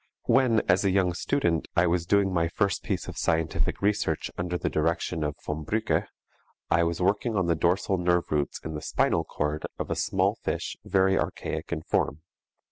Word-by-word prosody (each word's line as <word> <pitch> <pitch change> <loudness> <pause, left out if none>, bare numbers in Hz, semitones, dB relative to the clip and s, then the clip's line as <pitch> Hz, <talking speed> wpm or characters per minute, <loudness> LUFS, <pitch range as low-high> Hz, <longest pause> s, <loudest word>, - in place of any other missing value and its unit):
When, 125 -4 +4
as 90 +2 +4
a 100 - +3
young 95 -2 +2
student, 85 - 0
I 85 - +4
was 85 -1 0
doing 100 0 +3
my 85 -1 +2
first 100 +2 0
piece - - -3
of - - -6
scientific 80 +3 0
research 105 0 0
under 90 0 -2
the - - -2
direction 80 +1 0
of 75 -1 -2
von 75 +1 -3
Brücke, 110 +8 0 0.6
I 85 - +4
was 85 0 -1
working 100 +5 +1
on 95 -3 +2
the 85 - +2
dorsal 90 +3 +1
nerve 90 -1 +1
roots 75 -2 0
in 80 - -4
the 75 - -5
spinal - - +1
cord 75 +1 -3
of - - -4
a - - +1
small - - +1
fish - - -3
very 95 0 +2
archaic - - -3
in 80 - -2
form. 80 - -1
90 Hz, 190 wpm, -27 LUFS, 80-95 Hz, 0.6 s, When